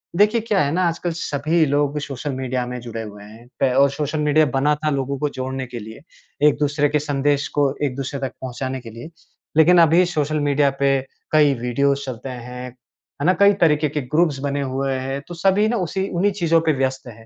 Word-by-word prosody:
देखिए, 210 Hz, +4 st, +3 dB
क्या 210 Hz, -3 st, 0 dB
है 140 Hz, 0 st, +1 dB
ना 180 Hz, +2 st, +1 dB
आजकल 170 Hz, +1 st, -2 dB
सभी 160 Hz, 0 st, 0 dB
लोग 145 Hz, +1 st, 0 dB
सोशल 140 Hz, 0 st, -5 dB
मीडिया 130 Hz, -1 st, -2 dB
में 125 Hz, 0 st, -5 dB
जुड़े 115 Hz, -1 st, -6 dB
हुए 105 Hz, -1 st, -10 dB
हैं, 110 Hz, +3 st, -14 dB
पे 130 Hz, -2 st, +2 dB
और 140 Hz, +1 st, +5 dB
सोशल 150 Hz, +1 st, -3 dB
मीडिया 150 Hz, +1 st, +3 dB
बना 145 Hz, +3 st, +2 dB
था, 155 Hz, +1 st, -2 dB
लोगों 140 Hz, -1 st, -2 dB
को 150 Hz, -, 0 dB
जोड़ने 130 Hz, 0 st, -4 dB
के 120 Hz, -1 st, -7 dB
लिए, 110 Hz, +3 st, -10 dB, 0.5 s
एक-दूसरे 145 Hz, 0 st, +1 dB
के 150 Hz, +1 st, +1 dB
संदेश 145 Hz, -1 st, 0 dB
को 140 Hz, -1 st, +3 dB
एक 125 Hz, -2 st, -3 dB
दूसरे 135 Hz, 0 st, -4 dB
तक 135 Hz, -1 st, -3 dB
पहुँचाने 130 Hz, +1 st, -4 dB
के 115 Hz, -, -10 dB
लिए, 115 Hz, +8 st, -10 dB, 0.5 s
लेकिन 175 Hz, +3 st, +6 dB
अभी 165 Hz, +3 st, +5 dB
सोशल 155 Hz, -3 st, -1 dB
मीडिया 145 Hz, -1 st, +2 dB
पे 135 Hz, -1 st, +3 dB, 0.3 s
कई 150 Hz, -2 st, +5 dB
वीडियोज 140 Hz, +3 st, 0 dB
चलते 130 Hz, +1 st, -6 dB
हैं, 125 Hz, 0 st, -7 dB, 0.5 s
है -, -, 0 dB
ना? 185 Hz, -, +5 dB
कई 200 Hz, 0 st, +6 dB
तरीके 150 Hz, -1 st, +2 dB
के 150 Hz, +1 st, -3 dB
ग्रुप्स 150 Hz, +2 st, +1 dB
बने 140 Hz, 0 st, -1 dB
हुए 135 Hz, 0 st, -2 dB
हैं। 135 Hz, +1 st, -3 dB
तो 175 Hz, -, -7 dB
सभी 195 Hz, +5 st, +2 dB
ना 235 Hz, +1 st, 0 dB
उसी 190 Hz, +3 st, -2 dB
उन्हीं 195 Hz, +4 st, +1 dB
चीज़ों 165 Hz, -4 st, +2 dB
पे 160 Hz, -2 st, +2 dB
व्यस्त 130 Hz, -1 st, -2 dB
है। 115 Hz, -1 st, -12 dB
140 Hz, 210 wpm, -21 LUFS, 130-155 Hz, 0.5 s, लेकिन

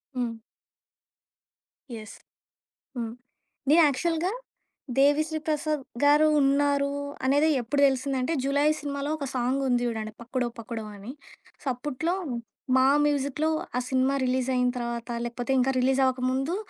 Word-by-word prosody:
హ్మ్. 235 Hz, -2 st, -2 dB, 1.6 s
యెస్. 215 Hz, -1 st, -9 dB, 0.8 s
హ్మ్. 230 Hz, -2 st, -4 dB, 0.6 s
నే 300 Hz, -, +7 dB
యాక్చువల్‌గా 330 Hz, +5 st, 0 dB, 0.7 s
'దేవిశ్రీ 305 Hz, +3 st, +3 dB
ప్రసాద్' 305 Hz, -2 st, -1 dB, 0.2 s
గారు 295 Hz, +2 st, +6 dB
ఉన్నారు 280 Hz, 0 st, +2 dB, 0.3 s
అనేది 290 Hz, +4 st, +4 dB
ఎప్పుడు 280 Hz, +5 st, -1 dB
తెలిసిందంటే, 265 Hz, +2 st, -1 dB
'జులాయి' 285 Hz, +3 st, +2 dB
సినిమాలో 285 Hz, 0 st, -3 dB
ఒక 285 Hz, -, -4 dB
సాంగుంది 255 Hz, 0 st, +1 dB
జూడండి. 220 Hz, -2 st, -3 dB
'పక్క్కడో 245 Hz, +1 st, -2 dB
పకుడో' 225 Hz, -1 st, -6 dB
అని. 205 Hz, +5 st, -8 dB, 0.5 s
సో, -, -, -18 dB
అప్పట్లో 295 Hz, +6 st, -2 dB, 0.6 s
మా 260 Hz, -, +5 dB, 0.2 s
మ్యూజిక్‌లో 290 Hz, +2 st, 0 dB, 0.3 s
ఆ -, -, +2 dB
సినిమా 260 Hz, +1 st, +2 dB
రిలీజయిన 255 Hz, 0 st, +1 dB
తర్వాత 235 Hz, 0 st, -4 dB, 0.2 s
లేకపోతే, 240 Hz, +1 st, -4 dB
ఇంకా 265 Hz, +2 st, +2 dB
రిలీజ్ 265 Hz, +1 st, +2 dB
అవ్వకముందు 260 Hz, +5 st, 0 dB
270 Hz, 115 wpm, -27 LUFS, 250-290 Hz, 1.6 s, నే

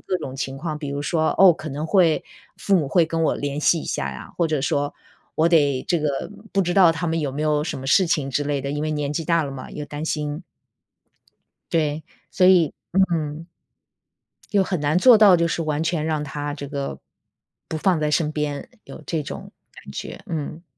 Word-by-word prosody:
各 185 Hz, -, -2 dB
种 130 Hz, 0 st, -7 dB
情 135 Hz, 0 st, -4 dB
况。 155 Hz, +1 st, -4 dB
比 145 Hz, -2 st, -5 dB
如 140 Hz, 0 st, -3 dB
说， 160 Hz, +1 st, 0 dB
哦， 195 Hz, -1 st, +9 dB
可 155 Hz, -, -7 dB
能 150 Hz, +3 st, -4 dB
会 170 Hz, -3 st, +3 dB, 0.4 s
父 200 Hz, -, +2 dB
母 155 Hz, -6 st, 0 dB
会 165 Hz, +2 st, +3 dB
跟 165 Hz, 0 st, -1 dB
我 -, -, +2 dB
联 145 Hz, 0 st, -3 dB
系 160 Hz, +2 st, +3 dB
一 -, -, -8 dB
下 70 Hz, 0 st, -2 dB
呀， 65 Hz, -, -9 dB
或 170 Hz, -, +2 dB
者 155 Hz, -3 st, -1 dB
说 145 Hz, +1 st, 0 dB, 0.4 s
我 160 Hz, +2 st, +3 dB
得 145 Hz, -6 st, +3 dB
这 175 Hz, -, +2 dB
个 150 Hz, +4 st, -2 dB, 0.2 s
不 195 Hz, -, +2 dB
知 175 Hz, -1 st, 0 dB
道 180 Hz, -4 st, +6 dB
他 170 Hz, +2 st, -3 dB
们 165 Hz, 0 st, 0 dB
有 145 Hz, -3 st, -2 dB
没 145 Hz, -, -4 dB
有 150 Hz, -1 st, +1 dB
什 155 Hz, -, -4 dB
么 135 Hz, -, -7 dB
事 185 Hz, +6 st, +4 dB
情 150 Hz, -4 st, 0 dB
之 145 Hz, +2 st, -1 dB
类 145 Hz, -1 st, -1 dB
的， 140 Hz, -, -4 dB
因 145 Hz, +1 st, -3 dB
为 155 Hz, -, -1 dB
年 150 Hz, -2 st, -2 dB
纪 165 Hz, -, -2 dB
大 170 Hz, -1 st, +2 dB
了 140 Hz, -, -5 dB
嘛， 135 Hz, -1 st, -8 dB
有 150 Hz, -, -6 dB
担 145 Hz, +2 st, -6 dB
心。 150 Hz, +2 st, -3 dB, 1.3 s
对， 155 Hz, -1 st, 0 dB, 0.3 s
所 185 Hz, -, +3 dB
以 175 Hz, -6 st, +5 dB, 0.2 s
嗯。 165 Hz, -4 st, 0 dB, 1.0 s
又 200 Hz, -3 st, +3 dB
很 180 Hz, -3 st, -2 dB
难 150 Hz, +3 st, +1 dB
做 240 Hz, +3 st, +7 dB
到 205 Hz, -4 st, +7 dB
就 170 Hz, 0 st, +2 dB
是 165 Hz, -, -2 dB
完 155 Hz, 0 st, -1 dB
全 160 Hz, -2 st, -1 dB
让 155 Hz, -2 st, -1 dB
它 145 Hz, 0 st, -4 dB
这 145 Hz, -1 st, -7 dB
个， 140 Hz, -1 st, -4 dB, 0.7 s
不 160 Hz, -, -3 dB
放 175 Hz, 0 st, +2 dB
在 150 Hz, 0 st, 0 dB
身 150 Hz, 0 st, +1 dB
边， 150 Hz, -2 st, -3 dB
有 -, -, -11 dB
这 160 Hz, -3 st, -2 dB
种 -, -, -8 dB, 0.2 s
感 -, -, -12 dB
觉， -, -, -7 dB
嗯。 160 Hz, 0 st, -5 dB
155 Hz, 235 characters per minute, -23 LUFS, 145-170 Hz, 1.3 s, 哦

